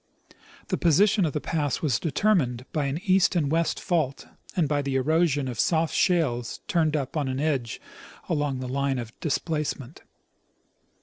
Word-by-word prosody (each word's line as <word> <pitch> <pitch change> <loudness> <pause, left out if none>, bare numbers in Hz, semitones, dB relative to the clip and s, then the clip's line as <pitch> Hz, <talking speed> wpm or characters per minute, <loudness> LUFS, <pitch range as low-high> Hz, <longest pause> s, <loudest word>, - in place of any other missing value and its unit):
The - - -1
position 195 +4 +4
of 150 - -2
the - - -1
pass 150 -2 -2
was 130 -7 +1
determined 155 - +1
by 150 -3 0
an 140 +2 -2
east 190 0 +3
and 150 -5 +1
west 165 +1 +1
fault 155 -7 -1 0.3
and 170 -5 +2
by 145 0 +1
the 140 -1 -2
erosion 145 0 +2
of 120 -4 -5
soft 160 -1 +2
shales 135 -10 +1
turned 160 -5 +1
up 140 -1 -3
on 135 -4 -1
edge 140 -7 -1 0.5
along 145 -5 -1
the 130 - -4
line 135 +1 0
of 120 -1 -6
displacement. 150 -3 -3
150 Hz, 160 wpm, -26 LUFS, 135-165 Hz, 0.5 s, position